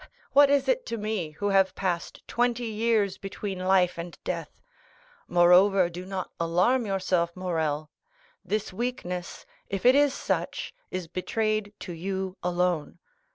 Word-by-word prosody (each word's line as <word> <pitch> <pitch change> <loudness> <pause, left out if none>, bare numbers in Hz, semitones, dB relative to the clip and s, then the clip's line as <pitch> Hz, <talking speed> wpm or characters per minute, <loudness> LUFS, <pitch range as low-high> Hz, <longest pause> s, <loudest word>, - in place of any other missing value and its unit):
What 285 0 +7
is 280 -1 +3
it - - +2
to 230 - -3
me, 210 -6 -2
who 205 +6 -2
have 195 -1 +3
passed 175 -3 -3
twenty 240 0 0
years 220 -3 +1
between 195 -1 -5
life 185 -2 +2
and 170 0 -7
death? 165 -4 -5 0.7
Moreover, 180 +1 +5
do 180 +2 -7
not 190 -1 -4
alarm 180 +9 +2
yourself, 180 -3 0
Morrel; 160 -5 -2 0.5
this 210 -2 -2
weakness, 185 -6 -4 0.2
if 195 +1 -3
it 250 - +8
is 285 0 +4
such, - - -2 0.2
is 185 -2 -4
betrayed 215 +3 -1
to 180 - -6
you 190 +2 -3
alone. 175 -3 0
190 Hz, 140 wpm, -27 LUFS, 175-215 Hz, 0.7 s, it